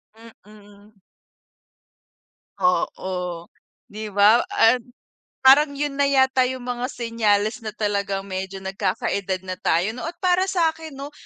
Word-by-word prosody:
Mm. 210 -2 -18 1.6
Oo, 180 -1 -1 0.4
di 215 +1 -7
ba 205 +4 +5
at 245 +2 +4 0.6
parang 285 +2 +6
'yun 290 0 -2
na 285 - +3
yata 265 -1 +3
'yung 260 -1 -6
mga 245 0 -3
senyales 225 -1 0
na 220 - -3
talagang 200 -2 -2
medyo 190 0 -5
nagkakaedad 190 -1 -2
na 185 0 -4
tayo 180 +7 +1
no, 250 - -6
at 335 +1 -7
para 365 0 +3
sa 340 -4 +2
akin 320 -3 -10
'no, 280 +2 -7
215 Hz, 130 wpm, -22 LUFS, 195-265 Hz, 1.6 s, parang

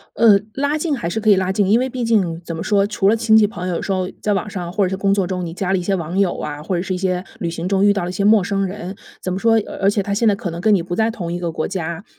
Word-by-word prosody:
呃， 220 -3 +6 0.2
拉 285 +2 0
近 310 -2 -1
还 235 - -3
是 195 +6 -2
可 215 0 +3
以 200 - +6
拉 190 0 0
近。 195 0 +1
因 220 - +5
为 255 +1 0
毕 250 -1 -4
竟， 190 -8 +1
怎 165 -1 -5
么 - - -4
说， 200 -2 +2
除 205 -2 +1
了 215 - +5
亲 225 -1 +3
戚 215 -1 +6
朋 185 -3 -6
友 175 - -1
有 - - -4
时 195 - -2
候 185 -1 -1
在 210 - 0
网 195 +1 -2
上 175 -3 -5
或 200 +1 +1
者 - - 0
是 190 - -2
工 195 +1 +1
作 195 -2 0
中， 180 -1 -3
你 165 - -6
加 190 +1 -2
了 190 - +2
一 - - -3
些 195 +2 0
网 175 0 -3
友 195 -3 +2
啊， 150 0 -5
或 175 +4 -3
者 175 - 0
是 190 - -3
一 - - -3
些 185 -1 -1 0.2
旅 170 - -2
行 170 +1 -4
中 195 0 +2
遇 205 - +6
到 200 -3 -2
了 175 - -3
一 - - -5
些 200 - -2
陌 210 0 +5
生 195 +1 -1
人， 185 0 -6 0.3
怎 185 - -2
么 185 - -2
说， 225 +2 +3
而 - - -8
而 195 - +5
且 205 0 0
他 200 - -4
现 220 +3 +1
在 210 - +5
可 195 -2 -5
能 170 +1 -6
跟 215 +3 +4
你 185 - +2
不 175 +1 -4
在 220 +1 +2
同 175 -7 -5
一 175 - -2
个 170 -2 -3
国 155 - -2
家。 170 -1 -4
195 Hz, 385 characters per minute, -19 LUFS, 180-210 Hz, 0.3 s, 呃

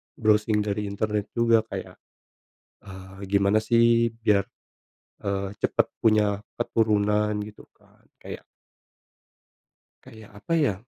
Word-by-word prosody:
browsing 105 -1 +2
dari 105 0 -2
internet 105 0 -2
juga 115 -1 +4
kayak, - - -7 0.9
eee, 95 0 -11
gimana 100 +2 +3
sih 115 0 +3
biar, 105 -3 +1 0.8
eee, 100 0 -2
cepet - - +1
punya 105 -2 +2 0.2
keturunan 105 -2 +1
gitu, 105 0 -10
Kak, - - -28 0.2
kayak - - -8 1.6
kayak 110 -1 -14
apa 100 - -5
ya? 145 -10 +2
105 Hz, 105 wpm, -25 LUFS, 100-115 Hz, 1.6 s, juga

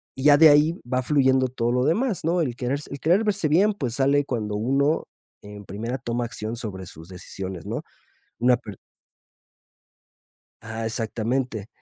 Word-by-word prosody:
y 130 - -6
ya 145 -1 +8
de 160 +1 +8
ahí 150 +4 +4
va 130 0 +2
fluyendo 130 -1 +3
todo 120 -1 -1
lo 125 +1 +1
demás, 215 - 0
¿no? 170 +2 +2
El 130 -7 -2
querer 125 +3 -2
s 150 - -9
el 140 - -6
querer 175 +9 +3
verse 200 -6 0
bien, 195 +8 +4
pues, 130 - -4
sale 140 +1 +2
cuando 110 -6 -3
uno 135 +8 +1 0.3
en 105 0 -11
primera 115 +7 -4
toma 120 0 -2
acción 110 -1 -5
sobre 95 -5 -6
sus 80 0 -12
decisiones, 95 -1 -7
¿no? - - -4 0.6
Una 125 +1 +4
per 105 -5 -10 1.8
ah, 110 0 -5
exactamente. 115 0 -2
125 Hz, 170 wpm, -24 LUFS, 110-145 Hz, 1.8 s, ya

